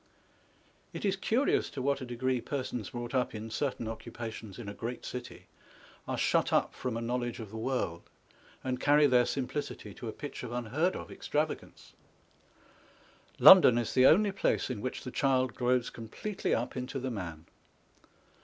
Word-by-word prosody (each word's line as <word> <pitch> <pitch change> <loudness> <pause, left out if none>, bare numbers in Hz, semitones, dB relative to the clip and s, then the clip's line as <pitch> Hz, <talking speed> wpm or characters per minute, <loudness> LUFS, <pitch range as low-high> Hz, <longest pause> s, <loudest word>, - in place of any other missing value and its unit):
It - - -4
is 195 -1 +2
curious 230 +8 +1
to 145 - -7
what 140 +1 0
a - - -4
degree 125 +1 -1
persons 125 -8 -4
brought 120 0 -6
up 125 -3 0
in 110 +1 -6
certain 120 -1 -2
occupations 115 -2 -7
in 120 -4 -8
a 100 - -5
great 120 +4 -5
city, 125 -1 -7 0.6
are - - -2
shut - - +2
up - - +2
from 125 -3 -3
a - - -3
knowledge 120 0 -2
of 110 -3 -8
the 110 - -6
world, 110 -8 -2 0.6
and 130 -1 -2
carry 145 +2 +5
their 125 -3 +4
simplicity 130 -5 -4
to 120 - -8
a - - -2
pitch 145 +5 -7
of 125 - -6
unheard 125 +10 0
of - - -7
extravagance. - - -3 1.4
London 170 -11 +9
is 120 -2 -1
the 130 0 +6
only 205 +4 +5
place 195 -8 0
in 110 -5 -4
which 130 - -4
the 125 - -6
child 130 -2 +1
grows 125 -1 +1
completely 120 - -3
up 120 - -3
into 130 +1 -4
the 130 0 -3
man. 85 -7 -6
125 Hz, 170 wpm, -31 LUFS, 115-135 Hz, 1.4 s, London